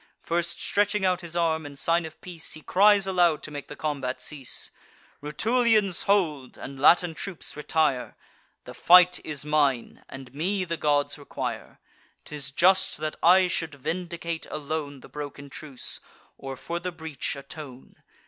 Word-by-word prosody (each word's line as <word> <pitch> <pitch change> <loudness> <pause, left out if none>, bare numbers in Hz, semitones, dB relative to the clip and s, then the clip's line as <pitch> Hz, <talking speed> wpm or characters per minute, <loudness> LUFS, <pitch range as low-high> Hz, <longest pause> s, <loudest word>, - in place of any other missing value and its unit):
First 170 0 -1
stretching 205 -1 +1
out 185 0 +2
his 170 -1 -6
arm, 160 -2 +1
in 145 -1 -9
sign 165 +3 +1
of 160 - -14
peace, 175 -3 -7
He 155 - -8
cries 200 +1 +5
aloud, 175 -5 +2
to 155 - -6
make 145 -1 -7
the 145 - -8
combat 140 -4 -3
cease: 140 -5 -4 0.5
"Rutulians, 215 - +2
hold; 160 -10 +1
and 135 0 -8
Latin 170 +4 +5
troops, 180 +2 -5
retire! 150 -4 0 0.5
The - - -10
fight 180 0 +6
is 150 -2 -4
mine; 145 -5 +1
and 135 -1 -10
me 185 +6 -1
the 170 -1 -2
gods 145 -2 +1
require. 145 - -5 0.5
'Tis 145 -3 -4
just 185 +7 +3
that 155 0 -3
I 185 +2 +6
should 165 -3 -2
vindicate 170 +2 -4
alone 145 -2 -4
The - - -12
broken 145 -1 -7
truce, 140 -4 -6 0.4
or 135 -1 -7
for 170 +6 -4
the 180 +1 -4
breach 160 -4 -4
atone. 140 -2 -9
160 Hz, 155 wpm, -26 LUFS, 145-180 Hz, 0.5 s, fight